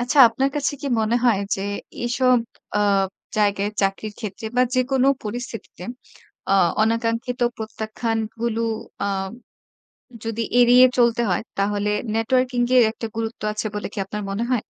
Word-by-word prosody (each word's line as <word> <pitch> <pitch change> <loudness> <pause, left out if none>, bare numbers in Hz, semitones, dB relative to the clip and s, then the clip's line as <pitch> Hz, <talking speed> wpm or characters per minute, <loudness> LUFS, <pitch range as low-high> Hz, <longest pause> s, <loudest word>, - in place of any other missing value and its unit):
আচ্ছা 250 +4 0
আপনার 270 +4 0
কাছে 290 0 0
কি - - -4
মনে 220 +2 +2
হয় 225 -5 +4
যে 195 - -4 0.4
এসব 255 +1 +3 0.4
আ - - +3 0.6
জায়গায় 205 -1 +2
চাকরির 195 +2 -1
ক্ষেত্রে 215 0 -6
বা 250 - +5
যেকোনো 260 +1 +2 0.2
পরিস্থিতিতে 225 -4 -6 0.7
আ 195 - +4 0.3
অনাকাঙ্ক্ষিত 230 +3 0 0.2
প্রত্যাখ্যান 220 +1 -3 0.2
গুলো 230 -1 -1 0.4
আ - - 0 1.2
যদি 225 0 -2 0.2
এড়িয়ে 245 +1 +8
চলতে 235 -1 +3
হয় 180 - +1 0.2
তাহলে 205 +1 0 0.3
নেটওয়ার্কিং 250 +2 +1
গে - - +1
এর - - +6
একটা 225 0 -6
গুরুত্ব 225 0 -4
আছে 210 - -4
বলে 210 - -3
কি - - -12
আপনার 210 +2 -5
মনে 205 +4 -1
হয়? 245 -4 +2
230 Hz, 145 wpm, -22 LUFS, 210-245 Hz, 1.2 s, এড়িয়ে